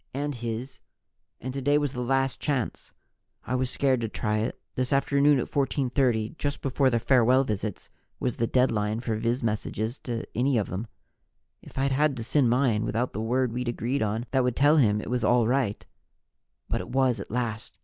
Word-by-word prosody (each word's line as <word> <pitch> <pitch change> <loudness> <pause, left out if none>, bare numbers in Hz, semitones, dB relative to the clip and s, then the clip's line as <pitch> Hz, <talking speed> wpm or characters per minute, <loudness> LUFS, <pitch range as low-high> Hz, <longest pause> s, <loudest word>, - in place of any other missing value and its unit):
"And 145 +1 -2
his. 120 +2 -5 0.6
And 130 +1 -5
today 140 +2 +2
was 145 -2 -1
the 125 - -3
last 135 +1 0
chance. 135 -6 -2 0.5
I 125 - -3
was 130 0 0
scared 130 -2 +1
to 115 - -2
try 105 0 -1
it. 110 - -3
This 130 -1 -2
afternoon 140 +1 +3
at 125 - 0
14:30, 130 -3 0
just 145 0 -3
before 135 0 +2
the 120 - +1
farewell 125 +2 +4
visits, 105 -4 -4 0.3
was 125 - -2
the 115 - +1
deadline 110 -4 +1
for 115 -2 -2
viz 120 +3 -1
messages 110 +1 -2
to 115 -2 -4
any 130 +2 +2
of 105 - -1
them. 100 +6 -4 0.7
If - - -14
I'd 135 +1 +1
had 140 0 +2
to 115 - -3
send 130 +1 +2
mine 120 -3 +2
without 120 +3 -1
the 110 - -3
word 125 +1 0
we'd 125 +1 -3
agreed 120 +3 -1
on 110 +2 -1
that 130 -2 +2
would 125 -1 0
tell 145 +3 +4
him 105 -6 +3
it 110 - -6
was 125 -1 0
all 120 +1 +4
right 120 -4 0 0.8
But - - -1
it - - -9
was, 130 -3 +2
at 100 - -7
last! 115 -1 -3
125 Hz, 195 wpm, -27 LUFS, 115-135 Hz, 0.8 s, farewell